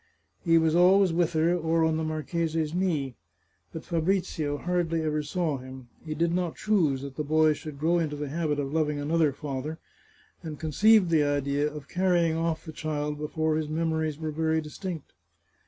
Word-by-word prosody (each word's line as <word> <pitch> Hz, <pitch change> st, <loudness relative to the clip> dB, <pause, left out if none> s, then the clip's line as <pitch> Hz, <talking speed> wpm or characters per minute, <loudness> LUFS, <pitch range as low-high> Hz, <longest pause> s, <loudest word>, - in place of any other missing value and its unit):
He 165 Hz, -2 st, +4 dB
was 160 Hz, 0 st, +3 dB
al 180 Hz, +3 st, +6 dB
ways 185 Hz, -4 st, +2 dB
with 170 Hz, 0 st, +1 dB
her, 160 Hz, +2 st, +2 dB
or 165 Hz, -1 st, +1 dB
on 160 Hz, -1 st, +1 dB
the 160 Hz, -, -2 dB
marchese's 155 Hz, 0 st, -2 dB
knee. 165 Hz, -8 st, 0 dB, 0.6 s
But 160 Hz, -, -8 dB
Fabrizio 165 Hz, -4 st, -1 dB
hardly 165 Hz, -1 st, -1 dB
ever 155 Hz, -1 st, 0 dB
saw 150 Hz, -1 st, -2 dB
him. 130 Hz, -1 st, -11 dB
He 155 Hz, -1 st, -5 dB
did 170 Hz, +2 st, +1 dB
not 175 Hz, -2 st, -1 dB
choose 160 Hz, -11 st, +1 dB
that 140 Hz, -1 st, -8 dB
the 150 Hz, -, -1 dB
boy 155 Hz, +1 st, +3 dB
should 150 Hz, -1 st, -8 dB
grow 165 Hz, +4 st, +2 dB
into 155 Hz, -3 st, -2 dB
the 145 Hz, -1 st, -4 dB
habit 155 Hz, -1 st, -1 dB
of 140 Hz, 0 st, -3 dB
loving 150 Hz, -2 st, +1 dB
another 155 Hz, +1 st, +2 dB
father, 145 Hz, +2 st, -5 dB, 0.6 s
and 155 Hz, -3 st, -7 dB
conceived 185 Hz, +4 st, +4 dB
the 155 Hz, -2 st, +4 dB
idea 145 Hz, +1 st, 0 dB
of 150 Hz, -2 st, -9 dB
carrying 175 Hz, -2 st, +2 dB
off 165 Hz, 0 st, -2 dB
the 160 Hz, -, -7 dB
child 150 Hz, -1 st, -3 dB
before 155 Hz, +1 st, -1 dB
his 155 Hz, -1 st, -3 dB
memories 160 Hz, -1 st, -1 dB
were 155 Hz, -1 st, -4 dB
very 160 Hz, +1 st, 0 dB
distinct. 160 Hz, +1 st, -7 dB
160 Hz, 185 wpm, -27 LUFS, 150-165 Hz, 0.6 s, al